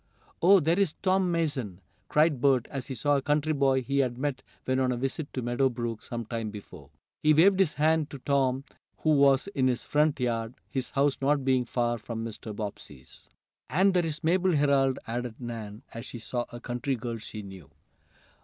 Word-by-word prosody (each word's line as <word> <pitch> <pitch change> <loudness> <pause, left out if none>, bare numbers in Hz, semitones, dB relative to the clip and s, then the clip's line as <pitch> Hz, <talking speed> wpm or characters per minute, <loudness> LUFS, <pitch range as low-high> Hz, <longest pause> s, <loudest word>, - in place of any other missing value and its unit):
"Oh, 195 +3 +7
there 165 +3 +1
is 195 -6 +1
Tom 190 -1 +2
Mason!" 145 - -2 0.3
cried 150 -4 +3
Bert, 130 -4 +3
as 135 -3 -4
he 135 - -5
saw 145 +5 +2
a - - -1
country 150 +2 +1
boy 135 -2 +2
he 140 +3 0
had 125 -3 0
met 135 -1 -2 0.2
when 130 0 +1
on 130 -1 +2
a 125 - -1
visit 135 +4 -3
to 130 - -3
Meadow 120 +3 +2
Brook 120 -2 -4
some 120 -1 -5
time 115 -1 -3
before. 105 -1 -11 0.3
He 155 0 +4
waved 190 +5 +5
his 185 -6 +3
hand 155 0 +2
to 140 - -7
Tom 135 -1 +1 0.4
who 155 - +3
was 140 -2 +4
in 135 -9 +1
his 125 -1 0
front 150 -1 +1
yard, 115 -1 -1 0.2
his 130 -1 -2
house 140 0 +1
not 140 0 +1
being 130 -2 +2
far 120 0 -1
from 115 +1 -5
Mr. 110 0 -7
Bobbsey's. 95 - -9 0.4
"And 190 +4 +3
there's 165 -3 -1
Mabel 180 +3 +2
Herold!" 140 -2 +3
added 120 0 -4
Nan, 115 -3 -7
as 115 +2 -7
she - - -7
saw 120 +2 -3
a 120 - -8
country 125 +3 -2
girl 115 -1 -5
she 110 0 -8
knew. 95 -6 -11
130 Hz, 195 wpm, -28 LUFS, 120-150 Hz, 0.4 s, Oh